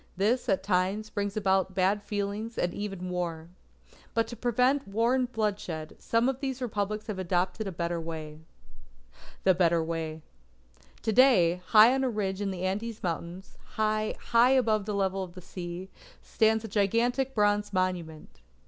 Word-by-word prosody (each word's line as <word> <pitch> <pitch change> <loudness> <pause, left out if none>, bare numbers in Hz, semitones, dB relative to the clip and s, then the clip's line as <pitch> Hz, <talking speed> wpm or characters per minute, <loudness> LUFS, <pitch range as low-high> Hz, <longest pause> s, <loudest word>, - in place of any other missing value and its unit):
This 225 +6 +1
at 190 - +1
times, 195 +3 0
brings 205 0 -2
about 190 -2 +1
bad 195 +2 +2
feeling, 205 +2 -3
and 175 0 0
even 195 -3 -5
war. 170 -2 -3 0.7
But 230 0 +3
to 240 - -6
prevent 250 +4 +1
war 225 +5 +1
and 255 -1 0
bloodshed, 200 -8 -3
some 230 +2 +1
of 265 -1 -1
these 265 -2 -3
Republics 215 -3 -2
have 205 -4 -5
adopted 185 +4 -1
a - - -3
better 170 -1 -2
way. 155 -2 -7 1.0
THE 190 - +5
BETTER 170 -2 +2
WAY 160 -1 -4 0.8
To 220 - 0
day, 185 -9 +5
high 220 +3 +7
on 265 0 0
a 260 - +1
ridge 200 -3 -2
of 200 - -1
the 185 -1 -5
Andes 210 +4 -3
Mountains, 175 +2 -5 0.2
high, 215 0 0
high 235 +1 +4
above 220 -6 +2
the 210 - -2
level 195 -1 0
of 180 -1 -10
the - - -8
sea, 175 +1 -7 0.3
stands 220 0 +1
a - - -5
gigantic 235 +6 +1
bronze 205 -1 +2
monument. 180 - -3
200 Hz, 165 wpm, -28 LUFS, 180-225 Hz, 1.0 s, high